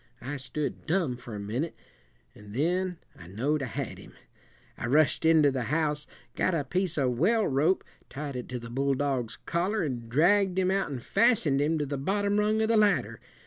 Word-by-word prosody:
I 140 +4 -4
stood 145 +4 -4
dumb 165 -7 +1
for 120 -2 -9
a - - -5
minute, 120 +11 -3 0.6
and 105 0 -12
then 180 +5 0 0.2
I 85 - -13
know'd 135 - -1
I 135 - -2
had 115 - -5
him. - - -14 0.6
I - - -4
rushed 150 +4 +3
into 155 -3 +5
the 130 -3 -2
house, 150 -1 0 0.3
got 185 - +1
a 150 - 0
piece 180 +4 -1
of 125 -4 0
well 215 +6 +3
rope, 145 +7 +2 0.3
tied 145 -1 -6
it 125 - -6
to 125 - -3
the 115 -1 -8
bulldog's 135 -2 0
collar, 185 +4 0
an' 120 -6 -4
dragged 185 - +3
him 185 0 +2
out 195 -3 0
and 130 -5 -5
fastened 150 - +3
him 155 +3 +1
to 150 - -1
the 140 -1 -4
bottom 205 +6 +1
rung 215 +1 +2
of - - +1
the 225 0 +3
ladder. 200 - +2
150 Hz, 195 wpm, -28 LUFS, 130-185 Hz, 0.6 s, into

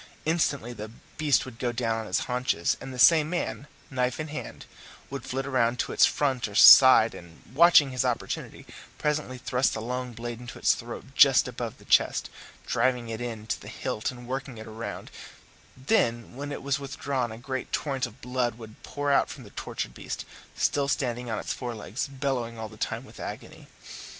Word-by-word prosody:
Instantly 145 -7 0
the 110 -1 -7 0.3
beast 150 -4 +3
would 125 -3 -11
go 120 - 0
down 115 -1 -1
on 110 - -6
his 90 - 0
haunches, 125 -9 0
and 135 - -7
the 130 - -8
same 155 +3 +6
man, 175 -4 -3 0.2
knife 125 0 -1
in 155 0 -4
hand, 150 - -7 0.5
would 135 -2 -5
flit 135 +1 -3
round 125 -3 +1
to - - -2
its - - +6
front 135 -5 0
or 105 - -10
side, 130 -1 +9
and, 85 -1 -13
watching 155 -2 +6
his 125 -1 0
opportunity, - - -3 0.3
presently 150 -4 -1
thrust 125 +1 0
the - - -3
long 125 +2 -4
blade 120 +1 -6
into 120 0 -9
its - - +4
throat - - -7
just - - +6
above - - -5
the - - -18
chest, - - +2 0.3
driving 120 -1 0
it 110 +1 -5
in 115 -3 -5
to 110 - -3
the - - -11
hilt 110 - -3
and 125 -1 -9
working 135 -1 -4
it 110 - -7
round; 110 +1 -7 0.7
then 120 - 0
when 145 +2 -5
it 140 - -6
was 140 +1 0
withdrawn 135 -3 -3
a 110 - -8
great 130 +2 -5
torrent 135 -3 -1
of 120 +2 -17
blood 125 -2 -1
would 110 -2 -12
pour 145 0 -2
out 140 - +3
from 135 - -9
the 105 - -14
tortured - - -5
beast, - - -6 0.3
still 140 -1 +1
standing 125 -4 -1
on 110 - -2
his - - -3
fore 120 -3 -5
legs, 110 +4 -4
bellowing 130 -4 -3
all 110 -1 -6
the 110 - -13
time - - -3
with - - -15
agony. - - -8
125 Hz, 195 wpm, -27 LUFS, 115-135 Hz, 0.7 s, side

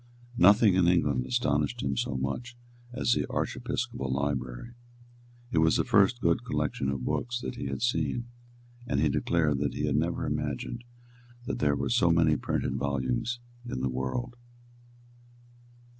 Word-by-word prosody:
Nothing 100 +3 +6
in 90 -1 +3
England 75 -8 +2
astonished 65 - 0
him 70 0 -1
so 65 +1 -1
much 120 - -4 0.3
as 125 -1 0
the - - 0
Archiepiscopal 65 -1 -2
library. 65 - -2 0.8
It 80 - +2
was 80 0 +4
the - - +2
first 105 +5 +3
good 85 -2 +2
collection 70 - -1
of 65 -2 -3
books 120 0 -1
that - - -4
he 125 - -5
had - - -3
seen; 120 0 0 0.6
and 70 - 0
he 75 0 +3
declared 75 0 +1
that 70 -2 -1
he - - -1
had - - 0
never - - 0
imagined 120 0 -3 0.6
that - - -3
there 75 -1 +2
were 70 -1 -2
so 85 - +3
many 80 -2 +4
printed - - -2
volumes 70 - -1 0.2
in 120 - -4
the 65 - 0
world. 65 - -3
75 Hz, 155 wpm, -28 LUFS, 65-110 Hz, 0.8 s, Nothing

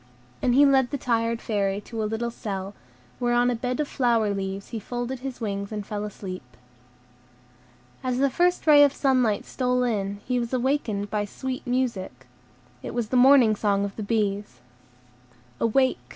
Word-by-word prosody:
And 245 -1 +2
he 285 +2 +7
led 265 -3 +4
the 285 - -2
tired 230 -2 0
Fairy 200 -2 0
to 225 +1 -6
a 215 - -1
little 235 +2 -2
cell, 195 -3 -5 0.5
where 240 -1 +1
on 245 +1 +3
a - - -1
bed 250 +4 -3
of 300 - 0
flower 230 -6 +1
leaves 195 0 -4
he 230 - -4
folded 245 +4 -4
his 260 -1 -6
wings 200 -3 -3
and 210 -2 -4
fell 210 0 -4
asleep. 190 -3 -7 1.6
As 255 -1 -1
the 275 +1 +2
first 355 +5 +1
ray 295 -2 +8
of 285 -1 +4
sunlight 255 -7 +1
stole 250 -1 0
in, 200 -4 -1
he 250 -1 0
was 235 +1 -4
awakened 245 -6 -1
by 210 -1 0
sweet 260 +6 -6
music. 230 - -2 0.6
It - - -7
was 235 -3 -2
the 255 - -1
morning 250 -3 +6
song 200 -1 +1
of 200 - -6
the - - -5
bees. 205 - -1 1.0
"Awake! 260 +3 +2
235 Hz, 175 wpm, -25 LUFS, 205-255 Hz, 1.6 s, ray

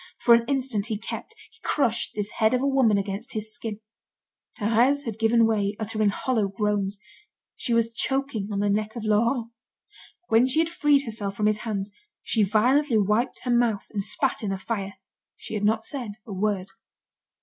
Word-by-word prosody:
For 235 - +5
an 235 0 +4
instant 260 -7 0
he 220 -2 -2
kept, 445 - -7 0.2
he - - -25
crushed, 235 -6 0
this 210 0 -2
head 220 +2 +2
of 250 - -1
a - - +2
woman 260 -7 +3
against 200 +5 -3
his 215 -1 0
skin. 220 -2 -5 0.8
Thérèse 240 +7 +2
had 225 -2 -5
given 225 +1 +4
way, 205 -2 0
uttering 215 -1 0
hollow 220 0 0
groans. 200 0 -1 0.6
She - - -4
was 230 0 +1
choking 265 -5 -1
on 200 -1 -1
the 205 - +1
neck 215 +2 -1
of 235 - -5
Laurent. 230 +2 +1 0.8
When 230 +3 +4
she 260 - +2
had 325 0 +3
freed 290 -4 +3
herself 210 -4 -4
from 210 - -1
his 215 0 +2
hands, 210 -3 -4 0.3
she 225 - +1
violently 235 +6 +3
wiped 215 +5 +1
her 250 - -1
mouth, 235 -4 +1
and 205 - -2
spat 270 +6 +1
in 210 - -2
the 195 - -2
fire. 195 -1 -4 0.4
She - - -9
had 210 -1 -2
not 220 +1 +2
said 245 -7 -3
a 215 - -7
word. 195 -1 -1
220 Hz, 185 wpm, -25 LUFS, 205-245 Hz, 0.8 s, For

